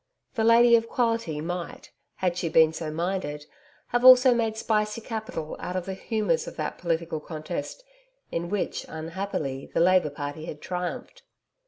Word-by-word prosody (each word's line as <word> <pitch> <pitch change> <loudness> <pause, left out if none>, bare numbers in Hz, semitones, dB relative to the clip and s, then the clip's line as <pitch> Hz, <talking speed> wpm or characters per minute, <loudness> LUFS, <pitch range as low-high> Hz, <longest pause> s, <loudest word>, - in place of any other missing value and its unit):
The 225 -4 0
'Lady 235 +1 +7
of 230 0 +1
Quality' 230 -11 0
might, 175 +1 -5 0.2
had 180 -2 0
she 175 -2 -2
been 160 0 +5
so 160 -1 -4
minded, 155 -3 -3 0.4
have 245 0 0
also 255 0 +9
made 225 -2 0
spicy 215 -1 0
capital 220 -9 -5
out 180 - -5
of 185 -1 -2
the 190 - -4
humours 205 -4 -1
of - - -7
that 155 - -4
political 165 -2 -1
contest 155 - -6 0.5
in 170 +1 -3
which, 205 0 -2
unhappily, 160 -4 -4
the - - 0
Labour 180 -2 +4
Party 145 +2 -6
had 150 -3 -7
triumphed. 180 - -5
180 Hz, 160 wpm, -26 LUFS, 160-220 Hz, 0.5 s, also